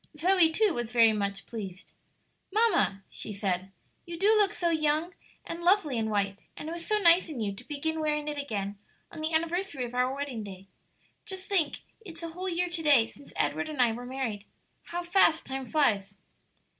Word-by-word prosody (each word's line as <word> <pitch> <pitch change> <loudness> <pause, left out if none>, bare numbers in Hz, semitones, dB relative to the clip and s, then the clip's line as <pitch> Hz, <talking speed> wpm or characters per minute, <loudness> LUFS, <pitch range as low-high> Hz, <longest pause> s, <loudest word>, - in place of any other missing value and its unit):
Zoe, 350 0 +4
too, 420 +2 +2
was 240 -3 -3
very 230 -2 +5
much 200 -1 -2
pleased. 195 -5 -8 0.6
"Mamma," 380 - +2
she - - -6
said, 195 -2 -2 0.3
"you 340 -1 -7
do 410 +5 +4
look 415 -2 +4
so 340 -1 0
young 310 +2 +1 0.3
and 335 - -6
lovely 345 -6 +3
in 220 -1 0
white; 200 -1 0 0.2
and 300 - -6
it - - -4
was 340 0 -6
so 425 - +2
nice 345 -3 +5
in 290 -6 -6
you 205 -3 -1
to 195 - -10
begin 315 +2 -2
wearing 300 -1 -1
it 295 -1 -3
again 205 -7 -4 0.3
on - - -8
the 315 +1 -1
anniversary 330 -3 0
of 240 - -8
our 250 +1 +1
wedding 275 -6 -4
day. 195 -1 -9 0.6
Just 380 -2 -6
think, 340 -8 0 0.2
it's 335 -4 -10
a 335 - -4
whole 365 +3 -4
year 360 +1 0
to 345 -1 -3
day 285 -7 +6
since 280 - -14
Edward - - 0
and 300 -3 -6
I 245 -2 +5
were 245 +2 -6
married. 245 -6 -4 0.4
How 350 +1 -4
fast 345 -2 +3
time 265 -1 -4
flies!" 205 -10 +1
300 Hz, 195 wpm, -29 LUFS, 225-345 Hz, 0.6 s, day